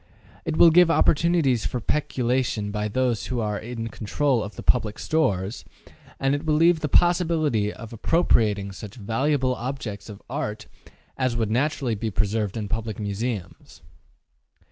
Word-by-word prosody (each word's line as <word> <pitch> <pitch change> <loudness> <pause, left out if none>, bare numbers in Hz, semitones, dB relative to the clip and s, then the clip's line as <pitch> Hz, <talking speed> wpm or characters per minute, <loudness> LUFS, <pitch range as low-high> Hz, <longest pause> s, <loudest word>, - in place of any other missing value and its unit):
It 160 -1 -2
will 170 - +8
give 175 +1 +6
opportunities 155 -5 +3
for 125 - -3
peculation 125 -5 -1
by 105 0 -2
those 120 +1 -1
who 125 -2 -2
are 105 -2 -2
in 115 0 -5
control 125 +4 0
of 105 - -8
the - - -8
public 110 -4 +1
stores, 105 - -1 0.6
and 135 0 +1
it 145 +2 -2
will 155 -2 +1
leave 165 +1 +4
the 150 - -2
possibility 160 - +2
of 115 +1 -10
appropriating 105 - +1
such 100 +1 -9
valuable 130 +5 0
objects 120 -5 -5
of 100 -2 -9
art 120 -5 -4 0.5
as 130 -3 0
would 110 -2 -1
naturally 130 0 0
be 110 +1 -2
preserved 105 +1 -1
in 105 -2 -3
public 110 0 -3
museums. 105 -2 -5
120 Hz, 150 wpm, -24 LUFS, 105-145 Hz, 0.6 s, will